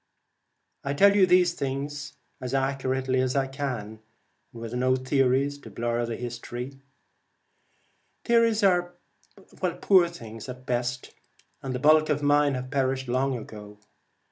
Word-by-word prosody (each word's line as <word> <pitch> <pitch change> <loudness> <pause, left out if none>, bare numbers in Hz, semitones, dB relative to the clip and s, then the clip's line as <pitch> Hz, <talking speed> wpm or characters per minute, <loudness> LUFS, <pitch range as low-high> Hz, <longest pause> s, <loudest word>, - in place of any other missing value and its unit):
I 140 +1 -2
tell 200 +7 +6
these 180 -3 +4
things 140 0 -4 0.3
as 130 +1 -3
accurately 130 -1 0
as 130 0 -1
I 135 -1 +2
can, 130 -6 -5 0.5
and 115 - -11
with 115 0 -6
no 130 +1 +2
theories 135 +1 +1
to - - -12
blur 120 0 -2
the 115 - -3
history. 120 +2 -7 1.4
Theories 230 -2 +3
are 175 -2 +2 0.9
poor 185 -3 +5
things 115 -9 -10
at 125 - -5
the 125 - -19
best, 125 0 -3 0.5
and 130 -1 -4
the - - -2
bulk 155 +2 +5
of 150 -1 0
mine 145 -1 +3
have 130 0 -6
perished 130 -2 0
long 130 +1 0
ago. 105 -2 -10
135 Hz, 140 wpm, -26 LUFS, 125-145 Hz, 1.4 s, tell